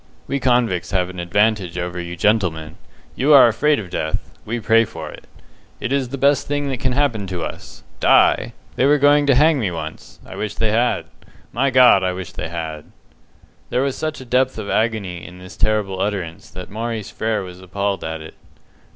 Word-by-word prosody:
We 140 - -2
convicts 120 -8 +1
have 90 -2 0
an 90 - -9
advantage 100 0 +1
over 90 0 -3
you 85 0 -6
gentlemen. 90 -5 0 0.4
You 145 +4 +3
are 135 - +9
afraid 145 +7 +2
of 95 -5 -6
death; 80 0 -3
we 120 +2 -3
pray 115 +1 +4
for 80 -7 -7
it. - - -13 0.5
It 135 - -2
is 135 -3 0
the 140 - -5
best 140 0 +2
thing 145 0 -1
that 130 -2 -3
can 130 -1 0
happen 125 -8 0
to 90 -3 -4
us. - - -8 0.2
Die! - - +4 0.3
They 130 - +3
were 145 +1 +5
going 145 +1 +4
to 140 - +5
hang 150 +2 +4
me 105 -6 0
once. 80 -2 -8
I - - -10
wish 105 -1 -4
they 110 -1 0
had. 120 +3 +1 0.5
My 135 +4 +2
God, 125 -6 +6
I 90 0 0
wish 90 -1 -7
they - - -5
had!" 80 -2 -5 0.8
There 125 - +1
was 140 -1 -1
such 155 0 -4
a 130 - -10
depth 130 +1 +1
of 105 -2 -4
agony 105 -6 -1
in 90 0 -11
this 90 +1 -12
terrible 100 -3 0
utterance 95 -6 -3
that 90 0 -9
Maurice 110 -1 -4
Frere 110 -2 -1
was 90 0 -10
appalled 100 +1 -2
at 80 0 -4
it. 80 - -10
105 Hz, 200 wpm, -20 LUFS, 90-130 Hz, 0.8 s, are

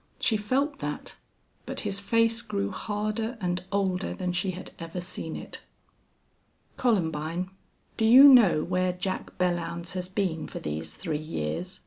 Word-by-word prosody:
She 225 - +2
felt 265 +8 0
that. 150 0 -5 0.5
But - - -3
his 195 - -1
face 230 +2 +2
grew 205 -4 -2
harder 215 +4 -2
and 180 -2 -1
older 190 -2 0
than 180 -1 -2
she 180 +2 0
had 185 0 -6
ever 165 +1 -5
seen 175 -2 -5
it. - - -7 1.1
"Columbine, 175 -5 0 0.5
do 220 - +2
you 250 +5 +9
know 235 - +8
where 180 0 0
Jack 185 +1 -4
Belllounds 175 -1 -1
has 180 -1 -3
been 185 -5 -1
for - - -7
these 80 +1 -5
three 150 - -3
years?" 155 - -4
185 Hz, 145 wpm, -27 LUFS, 170-215 Hz, 1.1 s, you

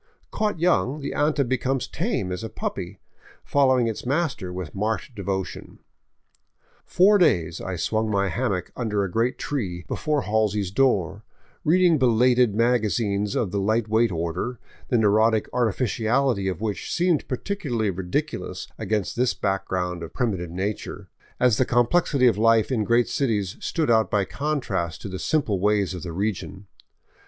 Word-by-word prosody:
Caught 210 -5 -1
young, 155 - +2
the 140 - -4
anta 145 -2 +1
becomes 130 +1 0
as - - -5
tame 95 -2 -2
as 90 +3 -4
a 110 - -4
puppy, - - -5 0.5
following 130 -3 +3
its 115 -2 -3
master 135 - -1
with 90 -3 -6
marked 110 +5 -2
devotion. 95 -2 -4 1.1
Four 200 +3 +5
days 85 - +2
I 95 - -4
swung 110 +5 -1
my 100 -1 +1
hammock 100 -5 -2
under 105 -4 -1
a 95 - -3
great 115 +6 0
tree 90 -12 -3
before 150 -3 -1
Halsey's 105 -3 0
door, 100 - +1 0.4
reading 170 -1 +4
belated 125 -2 +3
magazines 105 -3 +1
of 100 -6 0
the 100 - -1
light 110 +3 +1
weight 110 0 +3
order, 85 +8 -3 0.3
the 120 - +2
neurotic 110 +1 +3
artificiality 120 -1 +1
of 90 -1 -3
which 105 -2 -3
seemed 175 -3 +1
particularly 130 - -2
ridiculous 90 -1 -3
against 105 -3 -1
this 125 +1 +1
back 95 -1 -1
ground 90 -2 -2
of 85 0 -8
primitive 95 -8 -1
nature, 95 +5 -5 0.3
as 125 -4 +4
the - - +5
complexity 130 +3 +2
of 110 -5 +4
life 115 +1 +4
in 115 -4 +1
great 120 +2 +3
cities 105 -9 -1
stood 160 -7 0
out 110 -1 +3
by 100 -2 +1
contrast 105 - -2
to - - -5
the 95 0 -5
simple 140 - 0
ways 105 -1 +1
of 90 - -6
the 85 - -6
region. 100 +1 -3
110 Hz, 155 wpm, -24 LUFS, 95-130 Hz, 1.1 s, Four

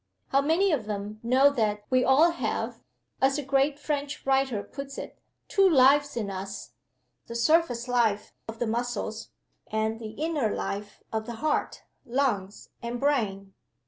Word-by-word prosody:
How 275 - +3
many 335 +7 +2
of 255 -9 -1
them 210 0 -4
know 260 +4 +5
that 210 -5 0
we 255 0 +4
all 300 +6 +5
have 340 - -3 0.4
(as 270 +2 +3
a 295 - -3
great 275 +1 +2
French 290 -1 -3
writer 265 -6 +1
puts 275 0 -8
it) - - -8 0.3
two 390 -2 +4
lives 285 -1 +5
in 210 -4 -2
us 195 -7 -6 0.6
the 235 - -7
surface 245 -1 +2
life 230 -4 +1
of 225 0 -7
the 240 - -1
muscles, 225 -1 -3 0.4
and 220 +1 -1
the 220 -2 -7
inner 305 -7 0
life 205 +1 -5
of 220 0 -2
the 235 - -5
heart, 300 +6 -1 0.2
lungs, 235 -7 -1
and 235 +1 -4
brain? 205 -9 0
245 Hz, 155 wpm, -27 LUFS, 220-280 Hz, 0.6 s, know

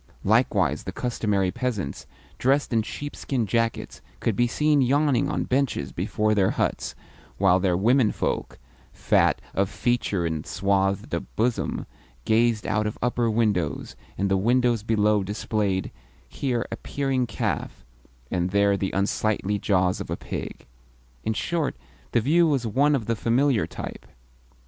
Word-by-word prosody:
Likewise 105 - +2
the - - -3
customary 105 -6 0
peasants, 105 - -3 0.3
dressed 135 0 +2
in 115 - +3
sheepskin 135 0 -3
jackets, 115 +2 -1 0.2
could - - 0
be 120 0 +3
seen 150 +3 +2
yawning 140 0 +2
on - - -1
benches 125 - 0
before 110 +10 0
their 100 -3 +3
huts, - - -1 0.4
while 95 -1 +4
their 90 -2 +1
womenfolk, 115 +3 +1 0.3
fat - - +2
of 100 0 +1
feature 110 -7 0
and 80 -2 -3
swathed 95 0 0
of - - -4
bosom, 115 +2 -1 0.4
gazed 115 -1 +2
out 105 0 0
of 105 - -4
upper 120 -1 +1
windows, 105 -8 0 0.2
and 100 - +1
the 95 - +4
windows 120 +2 +2
below 105 -1 +2
displayed, 100 -1 -1 0.4
here 125 -4 -2
a - - -3
peering 135 -3 -1
calf, 60 - -3 0.5
and 90 0 0
there 100 +1 +3
the 95 -1 -1
unsightly 105 +1 0
jaws 95 -2 +1
of - - -7
a - - -2
pig. - - -6 0.6
In 110 - 0
short, 165 +5 -1 0.4
the 120 - +3
view 165 +8 +4
was 135 -6 +1
one 140 +7 +3
of 120 -6 -2
the 115 - 0
familiar 120 +2 +2
type. - - -8
110 Hz, 145 wpm, -25 LUFS, 100-125 Hz, 0.6 s, while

